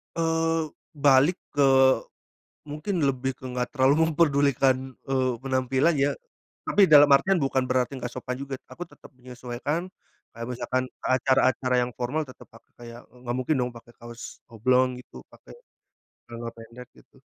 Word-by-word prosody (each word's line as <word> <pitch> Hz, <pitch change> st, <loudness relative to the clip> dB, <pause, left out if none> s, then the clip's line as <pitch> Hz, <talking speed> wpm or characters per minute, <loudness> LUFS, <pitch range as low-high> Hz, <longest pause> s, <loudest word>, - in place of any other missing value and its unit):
Eee, 165 Hz, -1 st, 0 dB, 0.2 s
balik 145 Hz, +3 st, +3 dB, 0.2 s
ke 135 Hz, -2 st, +5 dB, 0.8 s
mungkin 155 Hz, +5 st, -4 dB
lebih 135 Hz, -1 st, 0 dB
ke 130 Hz, -, -18 dB
nggak 125 Hz, +3 st, -4 dB
terlalu 140 Hz, +4 st, +3 dB
memperdulikan, 140 Hz, -4 st, +1 dB, 0.2 s
eee, 130 Hz, -1 st, +1 dB
penampilan 130 Hz, +4 st, +1 dB
ya, 140 Hz, +1 st, +2 dB, 0.6 s
tapi 205 Hz, -, +3 dB
dalam 145 Hz, -3 st, +7 dB
artian 185 Hz, +7 st, +4 dB
bukan 135 Hz, -1 st, 0 dB
berarti 130 Hz, +1 st, -1 dB
nggak 125 Hz, -1 st, -6 dB
sopan 125 Hz, 0 st, -5 dB
juga 140 Hz, 0 st, -6 dB, 0.2 s
aku 175 Hz, -, -8 dB
tetep -, -, -17 dB
menyesuaikan, 125 Hz, +7 st, -5 dB, 0.4 s
kayak 115 Hz, 0 st, -6 dB
misalkan 125 Hz, +1 st, -2 dB
ke -, -, -10 dB
acara-acara 130 Hz, -1 st, +1 dB
yang 120 Hz, -, -3 dB
formal 130 Hz, +6 st, -1 dB
tetep 130 Hz, -, -14 dB
pakai 115 Hz, -, -20 dB
kayak 120 Hz, 0 st, -11 dB
nggak 125 Hz, -1 st, -6 dB
mungkin 130 Hz, +5 st, 0 dB
dong 125 Hz, -1 st, -2 dB
pakai 115 Hz, 0 st, -14 dB
kaos 120 Hz, 0 st, -10 dB
oblong 125 Hz, +3 st, +2 dB
gitu -, -, -14 dB
pakai, -, -, -16 dB, 0.7 s
celana 115 Hz, 0 st, -7 dB
pendek 115 Hz, +2 st, -12 dB
gitu. -, -, -22 dB
130 Hz, 150 wpm, -25 LUFS, 125-145 Hz, 0.8 s, dalam